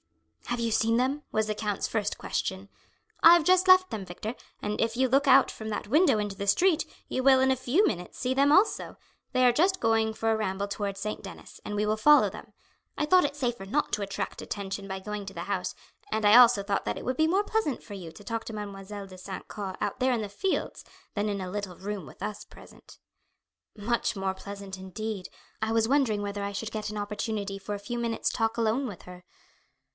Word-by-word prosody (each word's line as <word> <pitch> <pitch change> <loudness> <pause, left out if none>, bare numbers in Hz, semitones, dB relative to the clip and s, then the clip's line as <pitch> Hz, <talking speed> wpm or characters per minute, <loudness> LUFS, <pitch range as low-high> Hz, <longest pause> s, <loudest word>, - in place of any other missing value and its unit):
"Have 240 - -2
you 230 -1 0
seen 225 +1 +2
them?" 265 +4 0
was 220 0 +1
the 215 - -1
count's 210 -2 -2
first 210 -2 -2
question. 190 +1 -3 0.6
"I 335 +1 +10
have 340 - +3
just 370 +1 +4
left 370 0 +7
them, 215 -3 -4
Victor, 190 +6 -6 0.3
and 210 0 -2
if 230 +1 0
you 260 0 +3
look 275 +3 +3
out 270 0 +7
from 220 0 -7
that 210 0 -4
window 300 - +4
into 205 -2 -2
the 200 +1 -5
street 330 - +3 0.2
you 260 - -2
will 265 -1 +6
in 265 0 +4
a - - +3
few 260 - +2
minutes 180 - -4
see 255 0 0
them 280 +2 +4
also; 380 +8 +3 0.3
they 255 -1 +3
are 245 - +6
just 370 +8 +2
going 225 -1 +2
for 225 0 0
a - - +3
ramble 200 -2 -2
towards 200 -1 -3
St. 215 +2 -4
Denis, - - -11
and 210 - -5
we 210 +1 +1
will 215 +1 +1
follow 295 +7 +6
them. - - -11 0.5
I 300 - +1
thought 365 +3 +5
it 285 0 -1
safer 240 -8 -2
not 285 +10 -1
to 210 - 0
attract 195 -1 -4
attention 195 -1 -5
by 190 0 -3
going 210 +1 -5
to 195 - -7
the - - -6
house, - - -2 0.4
and 220 -1 0
I 205 +2 +7
also 240 -4 +7
thought 200 0 -1
that - - -3
it - - -7
would 255 - -1
be 315 - +4
more 385 +5 +2
pleasant 415 - -1
for 205 - -11
you 180 -5 -8
to 205 - -14
talk 230 +2 -3
to 225 - -6
Mademoiselle 200 -1 -7
de 185 -1 -12
St. 190 +1 -7
Caux 195 -3 -5
out - - -2
there 260 0 +2
in 240 -3 0
the 210 - -3
fields, 370 - -2 0.3
than 205 0 -1
in 200 -1 -2
a 185 -1 -5
little 200 -3 -5
room 200 -3 -5
with - - -15
us 210 - -4
present. - - -16 0.8
"Much 230 +2 0
more 190 0 -1
pleasant; 200 0 -8
indeed, 190 +1 -5 0.3
I 220 0 0
was 225 0 +2
wondering 245 -6 +2
whether 200 0 -3
I 200 - -2
should 220 +2 -4
get 215 -1 -4
an 210 - -5
opportunity 205 -1 -3
for 205 +1 -4
a - - -6
few 240 +4 -4
minutes' 230 -1 -1
talk 225 0 -1
alone 230 +4 +1
with 200 -7 -9
her." 180 0 -12
215 Hz, 230 wpm, -28 LUFS, 200-255 Hz, 0.8 s, I